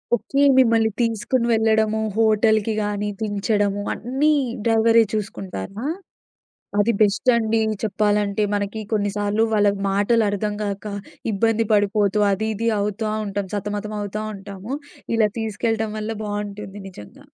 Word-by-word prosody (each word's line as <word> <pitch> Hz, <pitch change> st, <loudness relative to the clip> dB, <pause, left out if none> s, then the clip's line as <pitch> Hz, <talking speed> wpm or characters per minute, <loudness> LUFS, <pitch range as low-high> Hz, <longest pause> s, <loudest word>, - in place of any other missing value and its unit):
Okay. 275 Hz, +4 st, -1 dB, 0.2 s
మిమ్మల్ని 225 Hz, -3 st, +4 dB
తీసుకొని 230 Hz, +2 st, 0 dB
వెళ్ళడము. 220 Hz, -1 st, +2 dB, 0.2 s
హోటల్‌కి 220 Hz, 0 st, +3 dB
గానీ, 205 Hz, 0 st, -2 dB
దించడము 205 Hz, -1 st, 0 dB
అన్నీ 270 Hz, +6 st, +1 dB, 0.3 s
డ్రైవరే 225 Hz, 0 st, +5 dB
చూసుకుంటారా? 200 Hz, -, -5 dB, 0.9 s
అది 210 Hz, +3 st, +3 dB
బెస్టండి. 225 Hz, +1 st, +3 dB, 0.2 s
చెప్పాలంటే 210 Hz, -1 st, +1 dB
మనకి 205 Hz, +2 st, -2 dB
కొన్నిసార్లు, 205 Hz, 0 st, 0 dB
వాళ్ళ 205 Hz, -1 st, +4 dB, 0.2 s
మాటలు 205 Hz, +4 st, +2 dB
అర్థం 205 Hz, +1 st, -2 dB
గాక, 200 Hz, 0 st, -4 dB, 0.5 s
ఇబ్బంది 225 Hz, +2 st, +1 dB
పడిపోతూ 205 Hz, 0 st, +2 dB
అది 220 Hz, +3 st, -1 dB
ఇది 230 Hz, +3 st, -1 dB
అవుతా 210 Hz, +2 st, -2 dB, 0.2 s
ఉంటాం. 200 Hz, 0 st, -3 dB
సతమతమవుతా 210 Hz, +1 st, -3 dB
ఉంటాము. 200 Hz, +4 st, -7 dB, 0.4 s
ఇలా 220 Hz, -2 st, +4 dB
తీసుకెళ్ళటం 220 Hz, 0 st, -1 dB
వల్ల 215 Hz, +1 st, -3 dB
బావుంటుంది 205 Hz, -1 st, -5 dB
నిజంగా. 105 Hz, -, -13 dB
210 Hz, 110 wpm, -22 LUFS, 205-225 Hz, 0.9 s, డ్రైవరే